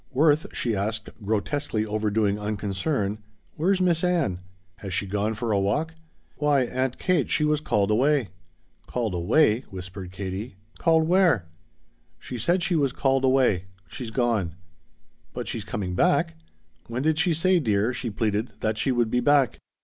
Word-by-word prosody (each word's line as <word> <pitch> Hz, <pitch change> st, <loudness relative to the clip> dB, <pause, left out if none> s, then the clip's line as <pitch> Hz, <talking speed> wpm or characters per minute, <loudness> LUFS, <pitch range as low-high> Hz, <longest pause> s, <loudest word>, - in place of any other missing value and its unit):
"Worth," 150 Hz, +3 st, +3 dB
she 115 Hz, -3 st, -1 dB
asked, 110 Hz, +2 st, -2 dB
grotesquely 110 Hz, +2 st, -1 dB
overdoing 105 Hz, -1 st, 0 dB
unconcern, 105 Hz, -, -2 dB, 0.3 s
"where's 185 Hz, +5 st, +1 dB
Miss 175 Hz, -2 st, +2 dB
Ann? 165 Hz, -, +1 dB, 0.4 s
Has 95 Hz, -2 st, -5 dB
she -, -, 0 dB
gone 105 Hz, +3 st, -1 dB
for 115 Hz, +1 st, -2 dB
a 100 Hz, -, +3 dB
walk?" 150 Hz, +12 st, 0 dB, 0.4 s
"Why, 145 Hz, -2 st, +3 dB
Aunt 130 Hz, +1 st, -2 dB
Kate, 180 Hz, -6 st, +1 dB
she 150 Hz, -, +2 dB
was 150 Hz, 0 st, +1 dB
called 105 Hz, -8 st, +1 dB
away." 135 Hz, +1 st, +2 dB, 0.6 s
"Called 115 Hz, -5 st, -2 dB
away?" 105 Hz, -, +3 dB
whispered 90 Hz, 0 st, -8 dB
Katie. 95 Hz, +3 st, -5 dB, 0.2 s
"Called 160 Hz, -2 st, +3 dB
where?" 175 Hz, -, +3 dB, 0.7 s
"She 125 Hz, -, -7 dB
said 175 Hz, -, +1 dB
she 175 Hz, -, +1 dB
was 140 Hz, -5 st, +1 dB
called 135 Hz, -1 st, +1 dB
away. 130 Hz, -9 st, +3 dB, 0.2 s
She's 120 Hz, +4 st, -6 dB
gone." 110 Hz, -8 st, 0 dB, 0.8 s
"But -, -, -5 dB
she's 110 Hz, -, -3 dB
coming 100 Hz, -4 st, -4 dB
back? 80 Hz, -2 st, +2 dB, 0.5 s
When 120 Hz, +3 st, -3 dB
did 155 Hz, 0 st, +2 dB
she 175 Hz, -1 st, +2 dB
say, 185 Hz, +3 st, +3 dB
dear," 110 Hz, -3 st, +1 dB
she 120 Hz, -, -4 dB
pleaded, 110 Hz, +1 st, -1 dB
"that 110 Hz, 0 st, -1 dB
she 135 Hz, -, +1 dB
would 120 Hz, -3 st, +1 dB
be 125 Hz, -, +2 dB
back?" 135 Hz, -1 st, +3 dB
115 Hz, 155 wpm, -25 LUFS, 105-150 Hz, 0.8 s, Worth